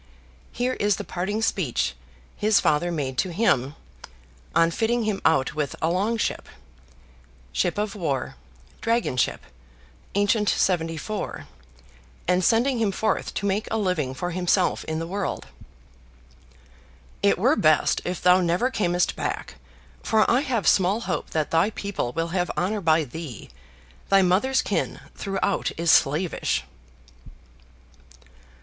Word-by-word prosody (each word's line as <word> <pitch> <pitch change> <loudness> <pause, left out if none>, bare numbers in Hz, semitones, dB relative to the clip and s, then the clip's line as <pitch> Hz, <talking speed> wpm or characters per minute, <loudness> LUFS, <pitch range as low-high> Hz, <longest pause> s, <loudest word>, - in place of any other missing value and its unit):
Here 250 +1 -1
is 205 -4 +1
the - - -5
parting 205 +5 -3
speech 150 - 0 0.4
his 215 -1 +3
father 155 +4 +1
made 135 -6 -3
to 185 - 0
him 150 - +1 0.8
on 165 0 +4
fitting 230 +5 0
him 210 -3 -1
out 135 -5 +2
with 150 -2 -2
a 165 +1 +1
"long 205 +6 0
ship" - - -2 1.0
(ship 175 - 0
of 210 -1 -1
war, 155 -9 -2 0.5
"dragon 230 - 0
ship," 125 - 0 0.7
ancient 205 +1 +2
seventy 165 -3 +1
four), 215 +6 -5 0.8
and 180 +1 +2
sending 240 +5 +3
him 215 -3 +1
forth 215 +3 -1
to 200 - -2
make 200 +2 0
a 225 - -1
living 175 -10 -1
for 175 +6 -3
himself 180 +1 +1
in 160 0 -3
the 165 - -3
world: 195 +3 -3 1.8
"It - - +3
were - - +3
best - - +3
if 180 0 -4
thou 180 +1 +6
never 180 +9 +1
camest 175 -7 +1
back, - - -4 0.4
for 220 -1 +2
I 245 - +4
have 245 - -1
small 195 +4 +3
hope - - -3
that 155 -2 -2
thy 165 +5 +3
people 200 - -3
will 165 +4 -2
have 180 0 -1
honor 205 +4 0
by 160 -2 +3
thee; 150 -3 -8 0.6
thy 195 -1 +5
mother's 205 +9 +2
kin - - -2
throughout 195 0 -1
is 170 0 +3
slavish." 155 +5 +2
185 Hz, 140 wpm, -24 LUFS, 165-210 Hz, 1.8 s, thou